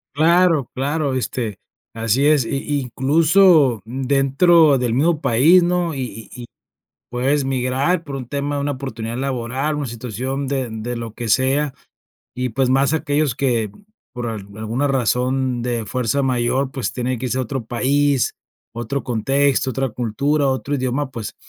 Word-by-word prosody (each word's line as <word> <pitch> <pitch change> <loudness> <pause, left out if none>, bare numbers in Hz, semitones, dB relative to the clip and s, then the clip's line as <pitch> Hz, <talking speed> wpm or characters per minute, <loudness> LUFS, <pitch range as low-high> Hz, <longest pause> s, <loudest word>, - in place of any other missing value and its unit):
Claro, 165 -2 +3
claro, 145 +1 -1
este, 120 -4 -3 0.3
así 115 +4 +1
es, 150 -4 +4
y 125 - -3
y 145 +1 -2
incluso 150 - +4
dentro 140 +5 +3
del 120 -2 0
mismo 155 +4 +2
país, 155 +11 +5
¿no? 175 -2 0
Y 135 - -4
y 120 0 -8
y - - -7 0.7
puedes 135 +3 0
migrar 135 +6 0
por 140 -3 -7
un 130 -3 -7
tema 145 +1 -2
de - - -1
una 145 0 -1
oportunidad 120 -4 -5
laboral, 130 +2 -2
una 145 -2 -3
situación 125 +4 -4
de 130 -3 -2
de 115 +2 -5
lo 115 -2 -6
que 120 -1 -5
sea, 135 +4 +2 0.6
y, 125 0 -2
pues, 130 +2 0
más 135 +2 +3
aquellos 150 -4 0
que, 120 -7 0 0.4
por 120 -1 -4
al 105 -3 -6
alguna 115 +6 -2
razón 130 -1 0
de 120 -3 -2
fuerza 130 +2 0
mayor, 130 +1 0
pues, 135 -4 -3
tienen 125 -1 -2
que 130 - -3
irse 125 +1 -1
a - - +1
otro 130 0 -4
país, 140 +3 +1 0.4
otro 120 +4 -3
contexto, 135 +3 +1
otra 135 +1 -1
cultura, 140 +6 0
otro 135 +2 -1
idioma, 130 +1 -2
pues, 115 -4 -6
130 Hz, 160 wpm, -20 LUFS, 120-145 Hz, 0.7 s, país